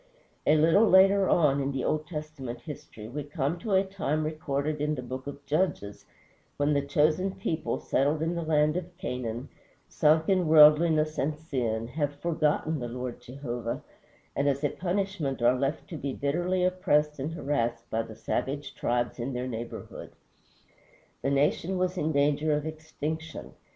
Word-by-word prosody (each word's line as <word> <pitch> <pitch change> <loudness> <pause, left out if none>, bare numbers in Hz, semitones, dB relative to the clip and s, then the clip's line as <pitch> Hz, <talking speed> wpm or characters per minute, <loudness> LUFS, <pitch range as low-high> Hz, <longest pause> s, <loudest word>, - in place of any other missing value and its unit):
A 150 - +6
little 165 +8 +5
later 195 +1 +6
on, 140 -4 +3
in 135 +1 -1
the 135 -2 -2
Old 155 0 -1
Testament 150 -7 -6
history, 150 -8 -9
we 145 +5 -5
come 145 +3 -2
to 210 +2 -2
a 190 0 +5
time 175 -6 -2
recorded 155 -1 -2
in 150 +1 0
the 125 - -5
Book 130 +2 -6
of 140 0 -8
Judges 145 - -1 0.5
when 145 +1 +2
the 140 - +2
chosen 155 +7 +1
people, 165 -5 -2
settled 145 +4 +1
in 165 +1 0
the 170 - -2
land 155 -1 +2
of 180 -1 -6
Canaan, 125 - -4 0.4
sunk 155 +1 +3
in 185 -3 +2
worldliness 155 0 +6
and 150 +3 0
sin, 120 -7 -2
have 145 +1 -2
forgotten 155 0 0
the 120 - -4
Lord 125 0 -5
Jehovah, 120 -2 -5 0.5
and 140 +1 +2
as 140 +1 -1
a 145 - +3
punishment 180 -6 -2
are 120 +1 +4
left 135 +4 -2
to 165 - -5
be 140 -2 -4
bitterly 175 +6 0
oppressed 150 -5 +2
and 150 +5 -3
harassed 120 -7 -1
by 115 - +1
the 110 -1 -9
savage 140 +6 -3
tribes 120 +1 -1
in 125 +3 -3
their 125 +1 -2
neighborhood. 115 -1 -7 1.1
The - - 0
nation 150 +6 +1
was 180 0 0
in 160 -3 0
danger 150 +1 +2
of 150 0 -1
extinction. 160 0 -5
150 Hz, 165 wpm, -28 LUFS, 135-160 Hz, 1.1 s, A